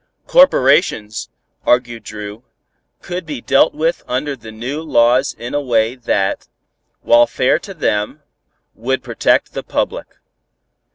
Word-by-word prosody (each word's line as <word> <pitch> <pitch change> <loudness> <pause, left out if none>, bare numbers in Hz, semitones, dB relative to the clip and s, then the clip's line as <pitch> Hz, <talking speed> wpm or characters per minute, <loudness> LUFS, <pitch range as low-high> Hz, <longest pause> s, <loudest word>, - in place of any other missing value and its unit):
Corporations, - - +3 0.3
argued 120 -2 +1
Dru, 105 +1 -8 0.6
could 180 +1 -4
be 150 -5 -6
dealt 135 +4 +3
with 160 +3 0
under 135 +3 -2
the 110 -3 -11
new 125 +8 -5
laws 125 -3 +2
in 120 +1 -7
a 145 - 0
way 115 -3 +1
that, 105 -6 -1 0.5
while 120 0 +5
fair 125 - +1
to 195 -2 -10
them, 135 0 -1 0.5
would 130 +4 -2
protect - - +1
the - - -4
public. - - -3
125 Hz, 125 wpm, -17 LUFS, 115-145 Hz, 0.6 s, while